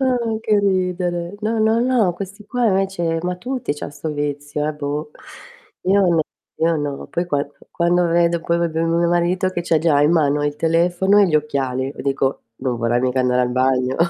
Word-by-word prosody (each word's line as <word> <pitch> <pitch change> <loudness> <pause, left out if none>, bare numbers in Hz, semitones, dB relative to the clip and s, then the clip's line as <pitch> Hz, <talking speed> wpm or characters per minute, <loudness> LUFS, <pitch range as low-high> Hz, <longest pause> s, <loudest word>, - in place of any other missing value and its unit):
Ah! 260 -2 +2 0.3
che 210 -1 +2
ridere! 180 -2 -1
No, 220 +1 -1
no, 220 +1 +3
no, 240 -8 +2
questi 195 +3 -8
qua 245 +2 0
invece 190 -4 0
ma 180 0 -1
tutti 245 - -3
c'han 145 - -7
sto 145 +2 -5
vizio, 145 0 -3
eh, 155 - -3
boh. 150 +1 -4 0.7
Io 195 +2 +4
n 170 -2 +3 0.4
io 165 0 +2
no. 145 -2 -4
Poi 175 - -2
qua 145 -3 -1 0.2
quando 175 0 +2
vedo 170 0 +2
poi 170 0 0
proprio 165 -1 0
mio 170 +1 +2
marito 175 +2 +1
che 175 -2 -3
c'ha 165 -2 +2
già 150 -3 +3
in 150 - +4
mano 145 -3 +2
il 145 0 -1
telefono 175 +5 +2
e 200 - +6
gli 160 - -1
occhiali, 135 -4 0
io - - -6
dico: 135 -1 -1
"Non 130 -2 -2
vorrai 120 +1 +1
mica 130 0 +1
andare 125 0 +2
al 125 - +1
bagno?" 130 0 +1
170 Hz, 195 wpm, -20 LUFS, 145-185 Hz, 0.7 s, e